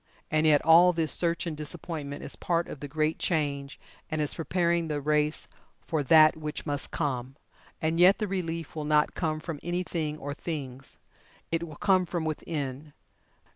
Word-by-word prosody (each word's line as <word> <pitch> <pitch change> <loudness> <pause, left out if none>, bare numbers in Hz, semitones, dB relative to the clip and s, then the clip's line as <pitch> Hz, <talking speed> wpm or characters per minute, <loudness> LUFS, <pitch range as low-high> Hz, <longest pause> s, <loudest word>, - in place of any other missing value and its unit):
And 155 0 +3
yet 150 -2 +4
all 175 +2 +7
this 165 -2 0
search 170 -1 0
and 165 -2 -3
disappointment 150 -1 -5
is - - -6
part 170 -1 0
of - - -8
the 145 - -6
Great 155 +2 0
Change, 140 -4 -1 0.3
and 155 - -2
is 150 -1 +2
preparing 170 0 0
the 150 -2 -2
race 150 +1 0 0.4
for 160 -2 0
That 155 +2 +6
which 150 -1 -5
must 145 -2 -2
Come. 130 -4 -3 0.5
And 160 +1 +1
yet 185 +3 +7
the 215 - -2
relief 165 -5 -3
will 155 - -3
not 150 0 +2
come 155 -3 -1
from 155 -2 -6
any 175 +1 -1
Thing 155 -4 -3
or 145 -1 -5
Things. 140 -5 -6 0.5
It 165 0 -1
will 155 - -10
come 185 +1 +2
from 170 -1 -2
Within. 150 -2 -4
155 Hz, 175 wpm, -28 LUFS, 150-170 Hz, 0.5 s, all